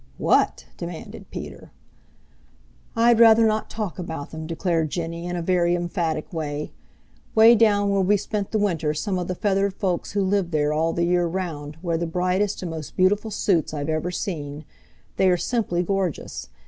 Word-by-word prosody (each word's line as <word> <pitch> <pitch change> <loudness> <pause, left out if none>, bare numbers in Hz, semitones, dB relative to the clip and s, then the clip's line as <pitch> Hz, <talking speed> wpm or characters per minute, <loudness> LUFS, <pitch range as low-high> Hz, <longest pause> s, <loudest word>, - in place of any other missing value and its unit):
"What?" - - +2
demanded 170 -1 -8
Peter. - - -8 1.2
"I'd 235 0 +4
rather 225 -1 +7
not 215 0 0
talk 210 -4 -4
about 160 -5 -5
them," 160 0 -6
declared 165 -1 0
Jenny 170 +1 -4
in 180 - -3
a 170 - -3
very 175 -1 +2
emphatic 175 0 -2
way. 150 -2 -4 0.6
"'Way 225 +1 +8
down 205 -3 +3
where 195 -1 +2
we 200 +2 +3
spent 205 0 -3
the 220 - 0
winter 165 -7 0
some 185 +4 -1
of 180 - -3
the 185 - -2
feathered 195 0 0
folks 185 -3 -2
who 200 -1 +1
live 190 -2 +1
there 150 -2 +1
all 160 +2 +1
the 170 - -1
year 175 0 +2
round 160 -4 -4
wear 170 -2 0
the 170 - -1
brightest 185 +4 0
and 175 - -4
most 160 -2 -7
beautiful 205 +4 +2
suits 185 -6 0
I've 145 +1 -3
ever 155 +2 -1
seen. 155 -6 -5 0.5
They 190 - +4
are 180 - +3
simply 180 -4 -1
gorgeous. 180 - -3
180 Hz, 175 wpm, -24 LUFS, 160-200 Hz, 1.2 s, Way